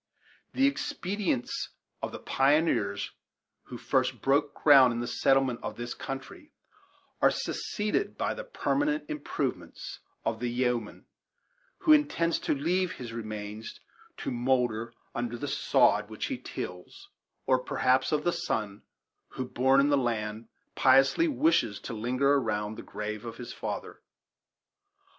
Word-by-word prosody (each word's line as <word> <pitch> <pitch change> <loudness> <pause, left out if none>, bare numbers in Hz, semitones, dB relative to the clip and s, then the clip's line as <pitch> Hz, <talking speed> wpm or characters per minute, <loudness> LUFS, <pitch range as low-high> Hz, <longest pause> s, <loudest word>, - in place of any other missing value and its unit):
The 270 - +3
expedients 195 - -1 0.3
of - - -3
the - - -6
pioneers 135 -8 +1 0.5
who - - -8
first - - 0
broke 145 +2 +2
ground 135 -4 +7
in 120 - -3
the 120 - -2
settlement 130 0 +2
of - - -5
this 120 0 -4
country 135 - -7 0.7
are - - +7
succeeded 210 - -2
by - - 0
the - - -6
permanent 310 - 0
improvements 130 - -4 0.3
of 115 -1 -1
the 120 0 -1
yeoman 120 -2 -1 0.8
who 310 - +6
intends 285 - +2
to - - 0
leave 175 +5 0
his 120 -3 -8
remains 110 -1 -6 0.4
to - - -4
moulder 120 -2 0 0.2
under 120 0 -3
the 145 - -4
sod 135 - +3
which - - -4
he - - -3
tills, 90 0 -8 0.4
or 130 -1 +3
perhaps 130 +2 +1
of 150 -1 +1
the 175 - +1
son, 105 -2 -2 0.5
who, 130 - -3
born 130 +2 +3
in 140 +1 +4
the 145 - +4
land, 110 -3 -2 0.3
piously 135 - +5
wishes 295 - +2
to 120 - -6
linger 125 +5 +1
around 110 -6 0
the - - -7
grave 105 0 -5
of 115 -1 -7
his 120 - -7
father. - - -5
130 Hz, 140 wpm, -29 LUFS, 115-150 Hz, 0.8 s, ground